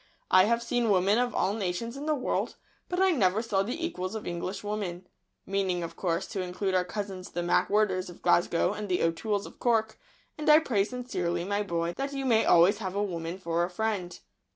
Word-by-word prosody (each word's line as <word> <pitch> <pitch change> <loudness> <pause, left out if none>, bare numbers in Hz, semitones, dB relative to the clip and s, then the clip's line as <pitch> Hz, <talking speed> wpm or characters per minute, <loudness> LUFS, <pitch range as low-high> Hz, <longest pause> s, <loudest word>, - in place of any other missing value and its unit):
I 185 0 +7
have 235 +2 +1
seen 235 -1 0
women 200 +3 +3
of 245 -1 0
all 195 - +1
nations 215 +3 -3
in 285 +2 -6
the 310 - +2
world, 255 - -2 0.3
but 360 - -1
I 380 0 +5
never 210 - +2
saw 205 -4 +1
the 250 +12 -2
equals 185 - -4
of 220 - -5
English 175 +3 -4
women 200 -4 -4 0.4
(meaning, 190 -3 -1
of 165 - -6
course, 170 -3 -1
to 195 - -3
include 185 +2 -2
our 185 -1 +3
cousins 190 -1 -5
the 175 - -3
MacWhirters 185 0 +2
of 175 - -13
Glasgow 175 +1 +3
and 210 -1 -5
the 180 - +1
O'Tooles 200 +5 0
of - - -13
Cork); 225 -2 +1 0.4
and 305 0 0
I 300 - +9
pray 235 -11 +1
sincerely, 185 -9 -3
my 205 +1 0
boy, 170 -3 -2
that 275 +1 -3
you 275 -1 -3
may 225 -3 +3
always 180 +5 +5
have 190 -3 -4
a 205 - +1
woman 170 -2 -4
for 170 -2 -1
a 175 - -1
friend." 190 -2 -2
200 Hz, 210 wpm, -28 LUFS, 180-225 Hz, 0.4 s, I